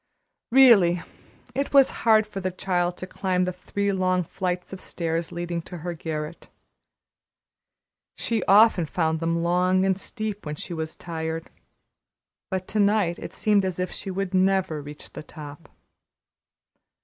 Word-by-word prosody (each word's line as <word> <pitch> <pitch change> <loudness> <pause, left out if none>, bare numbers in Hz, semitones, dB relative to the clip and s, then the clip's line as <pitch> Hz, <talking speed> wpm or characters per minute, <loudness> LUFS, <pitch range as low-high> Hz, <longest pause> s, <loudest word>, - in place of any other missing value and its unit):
Really 210 -10 +6 0.5
it 275 +1 -2
was 275 -1 +7
hard 220 -2 +5
for 210 -2 -7
the 185 -1 -1
child 180 -1 -1
to - - -6
climb 185 -1 -1
the 185 - -2
three 200 +3 -2
long 185 -1 +1
flights 180 +2 -4
of 190 - -7
stairs 165 -1 -3
leading 175 0 -3
to 180 - -7
her 175 +2 -4
garret. 160 -1 -6 1.7
She 230 -3 -1
often 200 -4 +5
found 160 0 0
them 165 0 0
long 180 +2 +2
and 190 0 +1
steep 215 -3 -5
when 150 -1 -4
she 170 - -7
was 160 -1 -4
tired, 160 -1 -5 1.0
but 190 -1 -3
to 215 - -1
night 200 -4 +2
it - - -7
seemed 205 -2 +3
as 185 -2 -2
if 180 - -2
she - - -6
would 195 0 -3
never 185 -4 +2
reach 145 +1 -11
the - - -7
top. 150 0 -11
180 Hz, 150 wpm, -25 LUFS, 165-195 Hz, 1.7 s, was